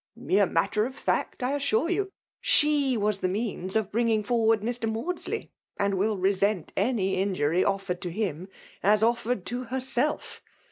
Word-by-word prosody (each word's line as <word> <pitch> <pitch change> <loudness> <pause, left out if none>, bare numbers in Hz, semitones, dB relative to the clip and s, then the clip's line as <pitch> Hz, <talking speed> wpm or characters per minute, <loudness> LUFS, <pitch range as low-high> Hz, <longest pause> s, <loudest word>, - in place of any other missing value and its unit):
" - - -67
Mere 205 -5 +2
matter 210 +7 +1
of 260 - -10
fact, - - -1
I 250 - +1
assure 280 0 +1
you. 385 +2 0 0.3
She 290 -4 +3
was 210 -1 0
the 185 - 0
means 195 -1 -3
of 220 -3 0
bringing 225 -1 +1
forward 225 -1 +2
Mr. 230 0 -2
Maudsley, 305 +12 -3 0.3
and 200 0 +1
will 205 +2 +1
resent 195 -1 +1
any 200 -2 +1
injury 185 -3 +1
offered 195 -2 -1
to 180 - -3
him 185 -2 -3 0.3
as 210 +2 +3
offered 235 -3 0
to 245 +2 -3
herself. 260 +3 -1
215 Hz, 160 wpm, -27 LUFS, 195-245 Hz, 0.3 s, She